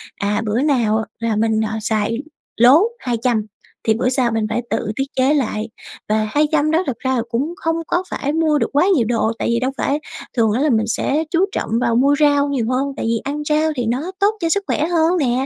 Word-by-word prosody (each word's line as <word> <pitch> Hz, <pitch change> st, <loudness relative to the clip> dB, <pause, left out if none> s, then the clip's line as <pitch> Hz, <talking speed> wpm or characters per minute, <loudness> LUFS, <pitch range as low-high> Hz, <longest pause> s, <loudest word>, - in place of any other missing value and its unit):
à, 205 Hz, +2 st, -1 dB
bữa 220 Hz, +5 st, 0 dB
nào 225 Hz, -7 st, +1 dB
là 230 Hz, -2 st, -1 dB
mình, 220 Hz, 0 st, +1 dB
ờ, 220 Hz, -, -5 dB
xài 220 Hz, +1 st, -1 dB, 0.4 s
lố 260 Hz, -, +6 dB, 0.2 s
200 235 Hz, -3 st, -1 dB, 0.4 s
thì 220 Hz, -, +5 dB
bữa 245 Hz, +3 st, 0 dB
sau 250 Hz, -3 st, +1 dB
mình 225 Hz, -1 st, 0 dB
phải 235 Hz, +2 st, -1 dB
tự 210 Hz, -, -1 dB
tiết 270 Hz, -, 0 dB
chế 265 Hz, +3 st, +3 dB
lại. 225 Hz, -5 st, -1 dB, 0.4 s
Và 215 Hz, 0 st, +1 dB
200 300 Hz, +1 st, +2 dB
đó 335 Hz, +4 st, +2 dB
thực 240 Hz, -4 st, -3 dB
ra 260 Hz, -1 st, 0 dB
là 235 Hz, -, +1 dB
cũng 275 Hz, +8 st, -1 dB
không 325 Hz, -4 st, -1 dB
có 355 Hz, +2 st, 0 dB
phải 285 Hz, +2 st, -2 dB
mua 315 Hz, -2 st, +2 dB
được -, -, 0 dB
quá 295 Hz, +5 st, +4 dB
nhiều 235 Hz, -5 st, +2 dB
đồ, 225 Hz, -1 st, +1 dB
tại -, -, -1 dB
vì 235 Hz, 0 st, +1 dB
đâu 260 Hz, +1 st, -1 dB
phải 285 Hz, +2 st, 0 dB, 0.4 s
thường 225 Hz, -2 st, +3 dB
á 245 Hz, +6 st, 0 dB
là 305 Hz, -, +2 dB
mình 220 Hz, -3 st, +1 dB
sẽ 285 Hz, +7 st, 0 dB
chú 360 Hz, +3 st, +3 dB
trọng -, -, -3 dB
vào 230 Hz, -, +1 dB
mua 280 Hz, +4 st, +4 dB
rau 290 Hz, -1 st, +3 dB
nhiều 255 Hz, -5 st, -1 dB
hơn, 260 Hz, +2 st, 0 dB
tại -, -, -3 dB
vì 230 Hz, 0 st, +1 dB
ăn 295 Hz, +2 st, -3 dB
rau 310 Hz, +1 st, +2 dB
thì 245 Hz, -3 st, -2 dB
nó 270 Hz, +11 st, -2 dB
tốt 405 Hz, +1 st, +4 dB
cho 330 Hz, -, 0 dB
sức 400 Hz, +3 st, +1 dB
khỏe 305 Hz, -, 0 dB
hơn 340 Hz, +1 st, +2 dB
nè. 260 Hz, -2 st, +1 dB
255 Hz, 235 wpm, -19 LUFS, 225-300 Hz, 0.4 s, lố